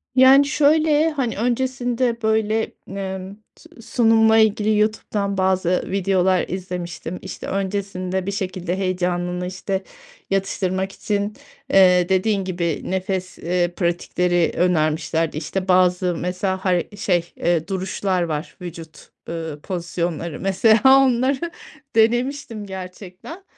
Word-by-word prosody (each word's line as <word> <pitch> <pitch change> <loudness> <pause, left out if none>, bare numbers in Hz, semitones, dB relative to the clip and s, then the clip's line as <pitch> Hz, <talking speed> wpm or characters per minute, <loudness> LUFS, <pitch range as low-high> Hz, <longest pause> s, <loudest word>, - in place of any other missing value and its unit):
Yani, 265 +2 +7
şöyle, 305 +2 +3
hani, 265 -6 -2
öncesinde, 245 0 0
böyle, 220 0 +1 0.2
emm, 190 0 -5 0.2
s - - -17
sunumla 225 -1 +4
ilgili 215 -1 +3
YouTube’dan 210 -2 -1
bazı 185 -1 +1
videolar 190 -1 +2
izlemiştim. 180 -1 -5
İşte, - - -7
öncesinde 190 -1 -2
bir 200 - -2
şekilde 185 -2 -3
heyecanını, 180 -1 -1
işte, 190 +1 -3 0.5
yatıştırmak 190 -1 -1
için, 205 +1 -2 0.4
eee, 180 -2 +5
dediğin 195 +1 +1
gibi, 170 -4 -2
nefes, 185 0 -3
eee, 175 +1 -1
pratikleri 175 -1 0
önermişlerdi. 160 -2 +1
İşte, 185 +5 -3
bazı 180 -1 +3
mesela 185 +2 -2
har 180 -2 +2
şey, 175 -4 0
eee, 170 -2 0
duruşlar 190 0 -1
var, 155 -1 -4
vücut, 165 -2 -10 0.2
ııı, 160 -3 -5
pozisyonları, 170 -2 -3
mesela 210 +3 +3 0.2
onları 265 +5 +1 0.4
denemiştim 235 0 +1
gerçekten. 190 - -9
190 Hz, 110 wpm, -21 LUFS, 180-220 Hz, 0.5 s, Yani